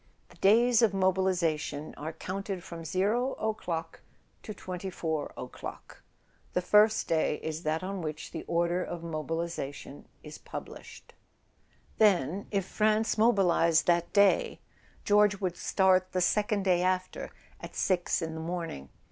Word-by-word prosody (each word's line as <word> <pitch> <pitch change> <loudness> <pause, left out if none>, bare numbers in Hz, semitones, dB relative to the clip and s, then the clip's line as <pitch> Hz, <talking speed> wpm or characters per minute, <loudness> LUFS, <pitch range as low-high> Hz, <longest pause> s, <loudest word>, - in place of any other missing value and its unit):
"The - - -18
days 230 +4 +5
of 215 -4 +3
mobilisation 175 -6 0
are 155 +2 -5
counted 190 +1 -5
from 165 -1 -8
0 215 - 0
o'clock 170 -7 -4 0.4
to - - -8
24 180 -5 -4
o'clock. 125 - -9 0.5
The 180 - +1
first 210 +3 +4
day 160 -2 +1
is 160 0 -4
that 160 +1 -1
on 195 0 -4
which 155 -1 -5
the - - -5
order 170 +1 +1
of 170 -1 -6
mobilisation 165 -3 -5 0.2
is - - -10
published." - - -10 0.9
Then, 195 -3 +3
if 195 -3 -1
France 215 +2 +1
mobilised 180 -7 +4
that 170 -1 +2
day, 210 - +3 0.5
George 205 -1 +4
would 185 -3 -2
start 185 0 +2
the 185 - +1
second 210 +2 +1
day 180 -2 +3
after, 185 0 -1 0.3
at - - -10
six 180 -2 0
in 160 0 -4
the 160 - -5
morning. 165 - -5
185 Hz, 135 wpm, -29 LUFS, 165-200 Hz, 0.9 s, days